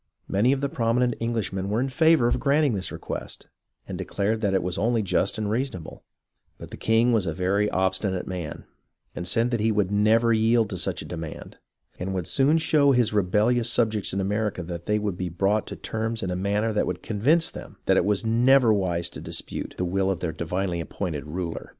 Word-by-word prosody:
Many 105 +6 +2
of 135 0 0
the 140 - +1
prominent 120 -3 +1
Englishmen 105 -5 -2
were 105 +3 0
in 130 - 0
favour 160 0 +4
of 120 - +1
granting 145 -2 +2
this 95 -2 -3
request, - - -6 0.4
and - - -6
declared 105 +3 -1
that 100 -3 +1
it 95 - +1
was 90 0 -3
only 115 +1 +1
just 100 +1 0
and 110 -1 -2
reasonable; 110 - -4 0.5
but - - -11
the - - -6
king 115 +2 +2
was 105 -5 +1
a 80 - -2
very 100 +3 +1
obstinate 95 0 -1
man, 90 -5 -6 0.5
and 90 - -4
said 115 +7 +1
that 120 - 0
he 110 +1 +2
would 105 -3 0
never 110 +3 +3
yield 110 0 +2
to - - -3
such - - -1
a - - -11
demand, 80 -2 -7 0.4
and 95 +2 -3
would 90 -3 -2
soon 140 - +3
show 145 -3 +3
his 120 -4 +2
rebellious 105 +5 +2
subjects 110 -4 +1
in 95 - -2
America 105 -1 -1
that 85 0 -7
they 105 - +2
would 105 -4 -2
be 90 -1 -3
brought 100 +5 0
to - - -6
terms 110 +1 -3
in 95 - -2
a - - -1
manner 100 +4 0
that 105 - +1
would 90 -1 -4
convince 145 +11 +2
them - - -10
that - - +3
it - - +4
was 105 +1 0
never 120 +1 +4
wise 90 -4 0
to - - -10
dispute - - -5
the 90 - -1
will 95 +2 0
of 95 - -1
their 85 - -2
divinely 90 +1 -2
appointed 80 -4 -4
ruler. 85 +1 -5
105 Hz, 210 wpm, -25 LUFS, 95-115 Hz, 0.5 s, favour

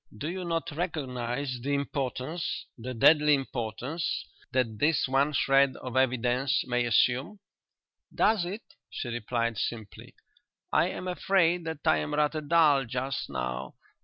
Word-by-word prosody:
"Do 150 +8 -3
you 185 0 -4
not 165 -1 -2
recognize 130 -5 -3
the 140 +3 0
importance 135 +1 -3
the 125 +2 -6
deadly 150 +4 +6
importance 135 +4 -3 0.3
that 120 -5 0
this 150 0 +2
one 135 +3 +2
shred 135 -1 +3
of 130 -1 -7
evidence 130 0 +2
may 125 -1 0
assume?" 130 - +2 0.7
"Does 215 -4 +2
it?" 195 +6 -5 0.3
she 120 - -5
replied 115 -1 -2
simply. 110 -4 -5 0.6
"I - - +4
am 185 - -5
afraid 180 -2 +2
that 160 -3 -6
I 80 - +4
am 75 0 -2
rather 150 +1 +1
dull 150 -3 +4
just 125 +3 -3
now. 60 -1 -4
135 Hz, 135 wpm, -28 LUFS, 120-155 Hz, 0.7 s, deadly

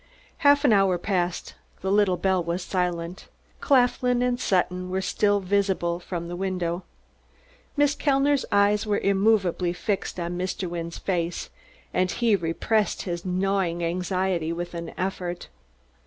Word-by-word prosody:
Half 285 0 +4
an 245 - +6
hour 195 -3 +4
passed; 175 -1 -2 0.3
the 190 - -1
little 200 -3 +3
bell 190 -2 +1
was 170 +2 -2
silent; 180 -1 -2 0.3
Claflin 250 -2 +3
and 250 0 0
Sutton 180 -4 0
were 190 +1 -1
still 205 +1 +1
visible 190 -3 0
from 170 -1 -5
the 175 - -5
window. 180 -2 -2 1.0
Miss 290 0 +4
Kellner's 280 -1 +2
eyes 205 +1 +3
were 205 -1 +2
immovably 195 -3 +2
fixed 185 +1 -3
on 170 0 -3
Mr. 185 0 -2
Wynne's 170 -1 -5
face, 175 -2 -2 0.4
and 185 0 +2
he 230 +1 +2
repressed 200 +5 0
his 175 -2 -4
gnawing 185 -2 0
anxiety 180 -1 -1
with 175 +1 -4
an 170 -1 -5
effort. 180 -1 -3
185 Hz, 140 wpm, -25 LUFS, 175-205 Hz, 1.0 s, an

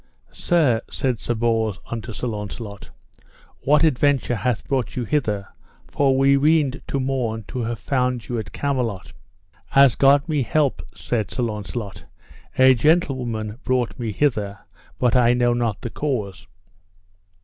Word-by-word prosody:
Sir, 145 -11 +2
said 130 -4 -1
Sir 120 - -2
Bors 110 -3 0
unto 115 0 -6
Sir 110 - -5
Launcelot, 105 -2 -6 0.7
what 150 +2 +3
adventure 140 -4 +2
hath 115 +3 -2
brought 130 -5 -1
you 125 - -2
hither, 105 -6 -1 0.4
for 135 -2 +1
we 135 +1 +4
weened 145 -2 +2
to 140 - -1
morn 125 -4 -2
to 130 - -4
have 115 0 -2
found 125 +2 -1
you 120 -2 -2
at 100 -4 -7
Camelot? 125 -9 -2 0.6
As 135 -3 +7
God 140 +3 +4
me 150 -3 0
help, 140 +3 +1
said 110 -4 -2
Sir 125 - -2
Launcelot, 105 -2 -5 0.5
a 130 0 +7
gentlewoman 125 -6 0
brought 125 -5 -1
me 115 -3 -2
hither, 105 -5 0 0.4
but 125 -2 +2
I 120 -1 +4
know 120 -1 +2
not 115 -4 -1
the 120 - -5
cause. 100 - -3
120 Hz, 145 wpm, -22 LUFS, 110-135 Hz, 0.7 s, As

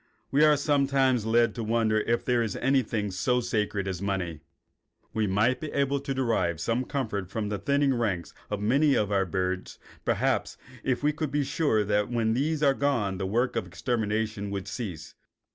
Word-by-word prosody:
We 145 +2 +4
are 150 -1 +6
sometimes 135 -5 +2
led 115 -1 +3
to 115 - -4
wonder 110 -1 +2
if 115 +2 0
there 120 -1 +2
is 110 -4 -2
anything 120 -6 0
so 125 +7 +1
sacred 105 -4 -1
as 95 -2 -3
money. 95 -5 -2 0.7
We 110 -1 +1
might 110 +7 +2
be 155 - -5
able 140 0 +1
to 135 0 -3
derive 110 - 0
some 115 +8 0
comfort 110 -10 -3
from 105 0 -3
the 105 -1 -2
thinning 140 +5 +2
ranks 105 -8 -2 0.2
of 105 -1 -3
many 140 +7 +3
of 105 -1 +1
our 95 -1 +2
birds, 95 +1 -2 0.3
perhaps, - - 0 0.3
if 130 +1 -1
we 150 +1 +3
could 155 0 -2
be 145 +1 0
sure 135 -7 +1
that 105 +1 +1
when 115 -2 +1
these 150 +5 0
were 140 -2 +5
gone 115 -10 0
the 95 - -1
work 120 +6 0
of 110 -5 -2
extermination 110 -1 -2
would 100 0 -4
cease. 95 -10 -6
115 Hz, 185 wpm, -27 LUFS, 100-135 Hz, 0.7 s, are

